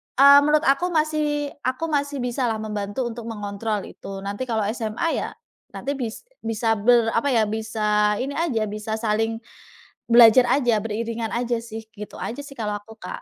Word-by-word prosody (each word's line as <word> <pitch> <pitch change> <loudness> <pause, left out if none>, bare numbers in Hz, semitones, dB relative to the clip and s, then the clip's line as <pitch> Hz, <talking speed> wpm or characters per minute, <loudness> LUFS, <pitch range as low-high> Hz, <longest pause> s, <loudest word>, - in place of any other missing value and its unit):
eee, 280 +1 +9
menurut 300 +1 +3
aku 280 +5 +3
masih 305 -2 0 0.2
aku 260 +6 -2
masih 285 -2 -1
bisa 245 +1 -1
lah 220 -2 -2
membantu 210 +2 -3
untuk 235 0 -8
mengontrol 210 -1 -3
itu. 195 0 -9
Nanti 200 +5 -4
kalau 220 -3 0
SMA 225 +6 -2 0.2
ya - - -5 0.5
nanti 280 - -3
bis 230 -3 -5 0.2
bisa 225 0 0
ber 230 +1 +4
apa 230 +5 +1
ya, 230 -3 +3
bisa 210 -1 +1
ini 275 +2 -3
aja, 275 -10 0
bisa 215 +1 -4
saling 225 0 0 0.7
belajar 240 +1 +8
aja, 245 -5 +2
beriringan 225 +1 -3
aja 235 0 -1
sih, 225 -1 -8
gitu 210 -1 -9
aja 245 +6 -5
sih 280 -1 -12
kalau 210 -2 -2
aku, 220 +1 -15
Kak. - - -7
230 Hz, 175 wpm, -23 LUFS, 215-265 Hz, 0.7 s, eee